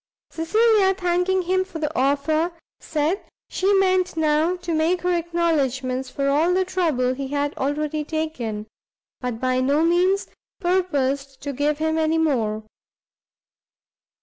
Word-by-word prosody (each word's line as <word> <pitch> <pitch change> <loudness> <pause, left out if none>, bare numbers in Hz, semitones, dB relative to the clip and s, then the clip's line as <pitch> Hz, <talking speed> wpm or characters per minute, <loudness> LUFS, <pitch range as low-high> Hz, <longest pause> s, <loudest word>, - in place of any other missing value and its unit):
Cecilia, 400 +3 +3
thanking 360 +1 +1
him 370 +2 +1
for 375 -3 -9
the 310 0 -3
offer, 300 +5 +1 0.3
said 315 +5 -1 0.3
she 385 +2 +1
meant 370 -2 +2
now 315 +3 +2
to 350 -2 -4
make 325 +3 +1
her 360 0 +2
acknowledgments 280 -7 0
for 275 +1 -2
all 315 +6 +3
the 375 0 +2
trouble 315 -9 0
he 270 +1 -5
had 285 +1 -2
already 300 +2 -1
taken, 270 -10 -3 0.5
but 250 -3 -4
by 255 0 +1
no 285 +4 +2
means 360 +4 +2 0.3
purposed 280 -8 0
to 285 -1 -3
give 290 +2 0
him 315 +1 0
any 320 0 +2
more. 225 -9 0
315 Hz, 135 wpm, -23 LUFS, 275-360 Hz, 0.5 s, Cecilia